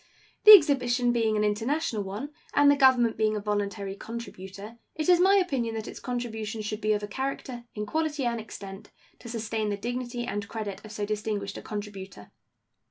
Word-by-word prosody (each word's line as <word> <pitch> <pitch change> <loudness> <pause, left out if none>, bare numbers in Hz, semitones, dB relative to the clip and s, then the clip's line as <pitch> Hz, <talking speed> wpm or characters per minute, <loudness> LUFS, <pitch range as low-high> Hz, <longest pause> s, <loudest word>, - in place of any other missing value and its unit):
The 425 - +13
exhibition 250 -7 +3
being 225 -2 +1
an 210 - +1
international 220 +3 0
one, 205 +9 -5 0.2
and 285 0 +6
the - - +4
Government 260 -4 +4
being 215 0 +2
a - - -1
voluntary 205 -1 -2
contributor, 210 -1 -8 0.2
it 310 -1 -2
is 355 -1 +6
my 385 +2 +5
opinion 270 - 0
that 220 0 -5
its - - -8
contribution 225 -3 -4
should 210 +1 -4
be 215 +1 +2
of 210 0 -2
a - - -3
character, 260 0 -4
in 210 0 -3
quality 300 +1 -1
and 235 -1 0
extent, 200 -2 -9 0.3
to 235 - -10
sustain 220 -2 -2
the 205 - -2
dignity 245 +2 -4
and 205 -2 -4
credit 205 -3 -5
of 215 - -10
so 210 -1 -3
distinguished 210 -1 -3
a - - -10
contributor. 195 - -8
220 Hz, 185 wpm, -27 LUFS, 210-250 Hz, 0.3 s, The